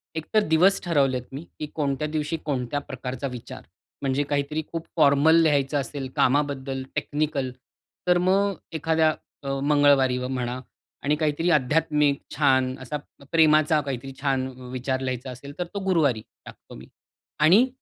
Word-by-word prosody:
एक 160 -1 -4
तर 215 -1 +4
दिवस 180 +5 +4
ठरवलेत 140 -7 +1
मी 140 +5 -6 0.2
की 155 - -2
कोणत्या 145 0 -1
दिवशी 155 +1 -2
कोणत्या 140 -1 -1
प्रकारचा 130 -1 -5
विचार, 125 -3 -8 0.4
म्हणजे 140 +1 0
काहीतरी 145 +2 -1
खूप 165 0 -4
फॉर्मल 145 +1 +5
लिहायचं 145 -2 +2
असेल 135 +1 -5
कामाबद्दल 135 -1 +1
टेक्निकल, 145 -3 -1 0.6
तर 180 0 +5
मग 195 +3 +2 0.2
एखाद्या 160 0 +2 0.3
अ, 135 - -4
मंगळवारी 140 -3 +4
म्हणा 125 -1 -3 0.4
आणि 145 +2 +2
काहीतरी 155 +2 0
आध्यात्मिक 150 0 +1
छान 130 -3 +2
असा 140 +4 -3 0.3
प्रेमाचा 155 -1 +4
काहीतरी 135 -1 -5
छान 135 -2 0 0.2
विचार 130 +1 -2
लिहायचा 130 0 -3
असेल, 140 +3 -10
तर 180 - -1
तो 200 - -2
गुरुवारी 150 - +2 0.2
टाकतो - - -13
मी 65 - -11 0.6
आणि 195 +12 +6
145 Hz, 140 wpm, -25 LUFS, 130-155 Hz, 0.6 s, आणि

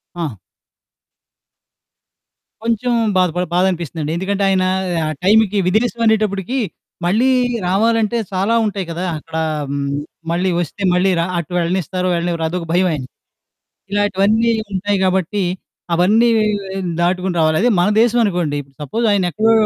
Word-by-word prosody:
ఆ! 160 -10 -3 2.3
కొంచెం 235 +2 0 0.3
బాధ 185 -1 +3
పడి 180 0 -1
బాధ 180 - +3
అనిపిస్తుందండి. 160 -2 -4
ఎందుకంటే 200 +2 -1
ఆయన 190 -1 +2 0.4
ఆ - - -1
టైమ్‌కి 210 0 +4
విదేశం 230 +4 +1
అనేటప్పటికి, 215 +2 +1 0.5
మళ్ళీ 220 +9 +3 0.4
రావాలంటే 225 +3 +2
చాలా 195 +4 0
ఉంటాయి 200 -3 -2
కదా! 175 +3 -3
అక్కడ 160 +1 -7 0.3
హ్మ్, 140 0 -2 0.4
మళ్ళీ 180 +2 +1
వొస్తే, 175 +4 -4
మళ్ళీ 180 +2 +3
ర - - +2
అటు 170 +1 -4
వెళ్ళనిస్తారు, 180 +1 -1
వెళ్ళనివ్వరు 170 -1 -1
అదొక 175 +1 -3
భయం 185 +1 +3
ఆయనకి. 135 -4 -5 0.8
ఇలాంటివన్నీ 205 +3 +2 0.2
ఉంటాయి 200 +1 0
గాబట్టి, 190 +1 0 0.5
అవన్నీ 210 +8 +4 0.7
దాటుకొని 180 +1 0
రావాలి. 155 0 +3
అదే 245 - +3
మన 180 - +3
దేశం 240 +1 +3
అనుకోండి. 175 -8 0 0.2
సపోజ్ 225 - -2
ఆయన 200 -2 +2
ఎక్కడో 220 +5 +2
190 Hz, 130 wpm, -18 LUFS, 175-215 Hz, 2.3 s, టైమ్‌కి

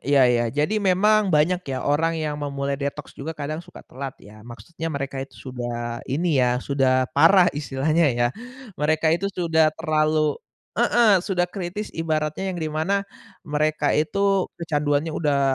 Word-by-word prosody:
ya 140 -1 +4
ya, 120 -1 +2
jadi 150 - 0
memang 205 +2 +3
banyak 170 +3 +2
ya 130 - -3
orang 165 +3 +1
yang 150 -2 -3
memulai 140 -1 -3
detox 140 +1 -4
juga 160 +3 -7
kadang 150 +2 -4
suka 175 - -14
telat 135 +1 -7
ya, 105 +1 -15
maksudnya 120 +9 -7
mereka 140 -3 -4
itu 135 - -9
sudah 120 -2 -5
ini 150 0 +1
ya, 125 0 +2
sudah 130 0 +1
parah 185 -3 +5
istilahnya 150 +3 +1
ya 120 0 +3 0.5
mereka 155 +1 +2
itu 190 +4 0
sudah 165 -4 +2
terlalu 155 -2 +1 0.4
heeh, 225 -5 +4
sudah 180 -2 0
kritis 190 +3 -5
ibaratnya 160 +3 -1
yang 175 - -5
di 155 - -2
mana 160 +6 0 0.4
mereka 155 +1 0
itu 195 +4 +1 0.2
kecanduannya 150 -1 0
udah 145 -3 0
155 Hz, 155 wpm, -23 LUFS, 140-175 Hz, 0.5 s, parah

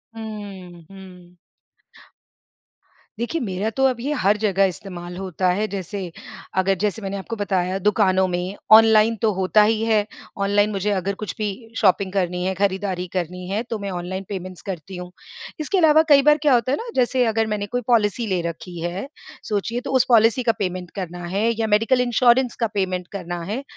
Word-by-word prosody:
हुँ, 200 -6 -8
हुँ। 180 -2 -14 1.8
देखिए, 260 +7 -2
मेरा 200 0 -2
तो 265 +4 -2
अब 255 -3 +1
ये 285 +5 -2
हर 205 +2 +3
जगह 195 -2 +2
इस्तेमाल 180 -1 -6
होता 185 -1 -1
है। 215 +3 -1
जैसे 190 -2 -5 0.5
अगर 190 +1 +3
जैसे 210 +1 -1
मैंने 195 0 -4
आपको 230 +4 -5
बताया, 190 -2 -1
दुकानों 190 -2 +2
में 180 +2 -3 0.2
ऑनलाइन 220 0 +6
तो 220 -2 +3
होता 190 +3 +3
ही 220 +1 +1
है। 215 -2 +2 0.4
ऑनलाइन 205 +1 +2
मुझे 200 +1 -1
अगर 195 0 -1
कुछ 215 - -6
भी 210 -1 -1 0.3
शॉपिंग 190 -2 +2
करनी 180 -2 -1
है, 190 - 0
खरीदारी 190 -2 -1
करनी 180 0 -3
है, 210 +3 -1
तो 230 -3 -5
मैं 200 -1 -4
ऑनलाइन 185 +2 -4
पेमेंट्स 185 -2 -6
करती 185 -1 -7
हुँ। 180 0 -8 0.5
इसके 340 +6 -1
अलावा 315 -2 +6
कई 280 -1 +7
बार 300 +1 +5
क्या 290 -4 +4
होता 245 +1 +2
है 285 - +1
ना, 470 +1 -6
जैसे 250 0 +2
अगर 225 0 +1
मैंने 210 -1 -2
कोई 245 - +1
पॉलिसी 225 -1 +2
ले 185 -3 0
रखी 170 +1 -9
है, 180 +8 -4 0.4
सोचिए, 230 +4 -1
तो 270 - -5
उस 255 - +4
पॉलिसी 230 +1 +4
का 230 - +3
पेमेंट 180 -2 -3
करना 175 -2 -5
है 220 +3 +2
या 220 - +1
मेडिकल 225 +5 +3
इंश्योरेंस 245 +1 +3
का 230 - +2
पेमेंट 185 -3 -2
करना 175 -3 -5
है। 260 +5 -3
200 Hz, 185 wpm, -22 LUFS, 185-225 Hz, 1.8 s, कई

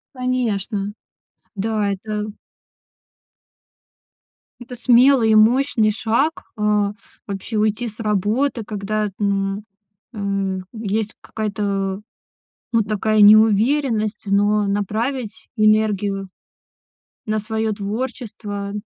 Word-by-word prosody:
Конечно, 220 -5 -1 0.6
да, 210 0 0
это 210 +2 -3 2.3
Это 245 0 -9
смелый 245 -1 +5
и - - +5
мощный 225 0 +4
шаг, 235 +9 0
а, 210 -1 +1 0.3
вообще, 200 +3 -4
уйти 215 +3 +1
с 220 +1 -9
работы, 220 +5 0
когда, 210 0 -2
м, 200 0 -1 0.5
э, 200 -2 -2
есть 220 0 -2
какая-то 200 -2 -2 0.7
вот 225 -3 +2
такая 215 0 +2
неуверенность, 215 +2 +4
но 205 +1 +2
направить 215 +4 -2
энергию 210 -2 +2 1.0
на 215 0 0
своё 220 +1 -2
творчество- 205 -1 -5
215 Hz, 85 wpm, -21 LUFS, 200-225 Hz, 2.3 s, смелый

